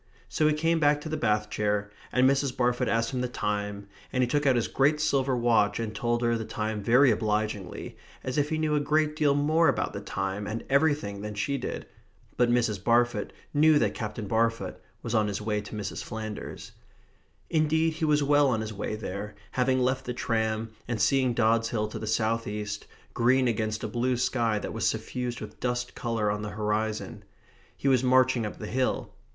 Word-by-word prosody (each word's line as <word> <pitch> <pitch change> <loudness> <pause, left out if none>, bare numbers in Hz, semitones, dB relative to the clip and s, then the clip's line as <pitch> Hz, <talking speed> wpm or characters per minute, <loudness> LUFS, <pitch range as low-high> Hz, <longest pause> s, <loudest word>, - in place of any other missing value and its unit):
So 155 - +1
he 155 - +3
came 165 +2 +1
back 145 -1 +3
to 155 - -6
the 155 - -1
bath 105 -7 0
chair, 105 0 -1 0.2
and 130 +1 +4
Mrs. 135 -1 +1
Barfoot 125 0 +1
asked 115 +1 +1
him 125 - -1
the 125 - 0
time, 105 -3 -3 0.2
and 130 - +1
he - - +2
took 145 +3 +1
out 130 - +5
his 120 - +1
great 145 +3 +2
silver 135 -4 +1
watch 115 -4 +2
and 110 -2 -3
told 120 +2 -1
her 120 0 +2
the 115 - -2
time 110 -1 -3
very 125 +5 +5
obligingly, 105 -3 -2 0.3
as 130 - -3
if 145 +1 +1
he 155 - 0
knew 155 -1 0
a 150 - +3
great 150 +1 +1
deal 150 -3 +3
more 155 +3 +3
about 135 -5 0
the - - -5
time 95 +2 -3
and 110 +3 -4
everything 140 -9 +2
than 105 0 -5
she 140 +8 -1
did. - - -5 0.5
But 120 0 +3
Mrs. 115 -5 +1
Barfoot 120 -2 +2 0.2
knew 155 +1 +5
that - - +1
Captain 110 -1 -5
Barfoot 115 +2 0 0.2
was 115 - -3
on 110 -2 +3
his 100 -1 -2
way 105 0 -1
to 105 +1 -9
Mrs. 105 -2 -4
Flanders. 110 -1 -6 0.8
Indeed 160 +1 +2
he 160 0 -2
was 150 -1 +3
well 145 0 +4
on 115 -4 +1
his 110 0 -5
way 105 +1 -3
there, 105 0 -6 0.2
having 130 0 +2
left 130 +1 0
the 125 - -4
tram, 110 -2 -1 0.2
and 120 -2 -2
seeing 130 +3 +2
Dods 115 -1 +2
Hill 105 -2 -1
to - - -6
the 110 - -5
south 115 +1 0
east, 105 0 -4 0.3
green 130 +2 +3
against 110 -2 -1
a - - -1
blue 125 +1 0
sky 115 -3 +1
that - - -4
was 115 - +1
suffused 120 +2 -4
with - - -9
dust 125 0 -2
colour 115 -4 -1
on 105 0 -3
the 105 - -4
horizon. 105 +1 -2 0.5
He - - -2
was 130 -2 +4
marching 130 -2 +3
up - - -8
the 105 - -6
hill. 130 +4 -1
120 Hz, 205 wpm, -27 LUFS, 105-135 Hz, 0.8 s, out